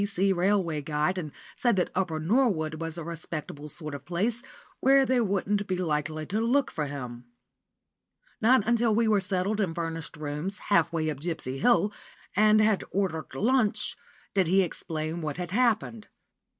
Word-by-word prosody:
B.C." 195 -1 +1
Railway 180 -4 +1
Guide, 150 +5 0
and 155 -4 -5 0.2
said 240 -5 +2
that 180 - 0
Upper 165 -5 -1
Norwood 160 -5 +1
was 165 0 -4
a 170 - -5
respectable 155 -2 -6
sort 155 0 -6
of 140 -2 -7
place, 205 +9 -1 0.4
where 270 0 +5
they 255 -1 +2
wouldn't 200 0 0
be 185 - -1
likely 155 -2 -2
to 210 +7 -1
look 250 +4 +2
for 150 -2 -2
him. 125 -4 -7 1.2
Not 230 -1 +5
until 235 -1 +2
we 230 0 +3
were 210 -2 +3
settled 190 +3 0
in 170 -5 -1
furnished 165 -3 -4
rooms, 150 +6 -4 0.2
half 170 -3 +4
way 160 -2 0
up 145 - -7
Gipsy 145 -5 -3
Hill, 210 - +3 0.4
and 215 +2 +5
had 215 -2 +3
ordered 185 -5 -2
lunch, 235 -1 +1 0.4
did 190 -4 +2
he 190 +3 +4
explain 160 -1 -4
what 150 -2 -3
had 180 -1 -4
happened. 225 -1 +1
180 Hz, 165 wpm, -28 LUFS, 155-215 Hz, 1.2 s, where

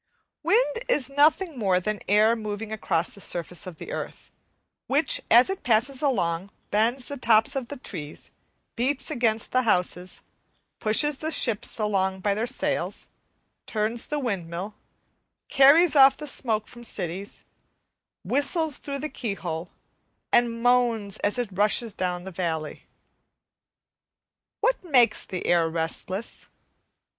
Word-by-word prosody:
Wind 460 +8 +2
is 280 - +2
nothing 305 +1 +2
more 190 -4 +2
than 210 +3 -3
air 215 +3 +4
moving 215 -1 -5
across 180 -6 -1
the 200 - -10
surface 175 0 -4
of 175 -3 -8
the 445 - -8
earth, - - -7 0.6
which 285 +4 +2
as 240 +2 +7
it 385 0 -4
passes 250 +3 +1
along 185 - 0 0.2
bends 235 +5 +1
the 285 - -5
tops 225 -2 +3
of 265 -3 -3
the 285 - -7
trees, 150 - -7 0.4
beats 270 +5 -1
against 230 -5 0
the 255 - +3
houses, 180 -5 -1 0.6
pushes 275 +7 +3
the 315 - -2
ships 230 -9 +2
along 190 -3 0
by 205 +1 +1
their 220 +4 -2
sails, 255 - -2 0.6
turns 220 +2 -2
the 300 - -2
windmill, 195 - -4 0.8
carries 300 +5 +6
off 270 -1 +7
the 300 - -7
smoke 225 -6 -2
from 240 0 -12
cities, 190 -2 -5 0.8
whistles 290 +2 +1
through 280 -1 -5
the 300 - -4
keyhole, 180 - -5 0.6
and 235 -1 +2
moans 235 -5 +2
as 205 +4 -1
it 245 -4 -2
rushes 210 +3 +2
down 180 -2 -3
the 190 - -8
valley. 165 -4 -4 1.7
What - - +1
makes 260 -9 +3
the 185 - -5
air 170 -2 +3
restless? 165 +5 -4
225 Hz, 135 wpm, -25 LUFS, 190-270 Hz, 1.7 s, as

